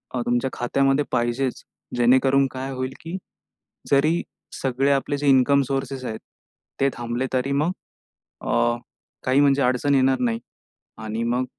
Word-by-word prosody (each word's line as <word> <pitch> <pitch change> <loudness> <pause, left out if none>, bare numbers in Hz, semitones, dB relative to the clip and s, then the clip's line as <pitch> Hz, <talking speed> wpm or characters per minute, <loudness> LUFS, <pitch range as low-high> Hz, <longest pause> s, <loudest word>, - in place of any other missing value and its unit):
अ, 125 - 0
तुमच्या 120 +2 +1
खात्यामध्ये 135 +3 +1
पाहिजेच. 120 +2 -1 0.3
जेणेकरून 130 +3 +4
काय 135 +1 -5
होईल, 130 0 -4
की 165 +3 -5 0.7
जरी 155 +5 +3 0.4
सगळे 135 +1 +1
आपले 140 +1 0
जे 145 - -2
इन्कम 135 +1 +5
सोर्सेस 135 -1 -3
आहेत, 110 -2 -4 0.6
ते 135 - +3
थांबले 120 +2 -3
तरी 130 +2 0
मग 150 +5 +1 0.7
अ, 120 0 +1 0.5
काही 130 +2 +3
म्हणजे 140 -1 +4
अडचण 130 +3 +2
येणार 130 0 +3
नाही. 115 -2 0 0.6
आणि 110 +1 -4
मग 125 +2 0
130 Hz, 140 wpm, -23 LUFS, 120-140 Hz, 0.7 s, इन्कम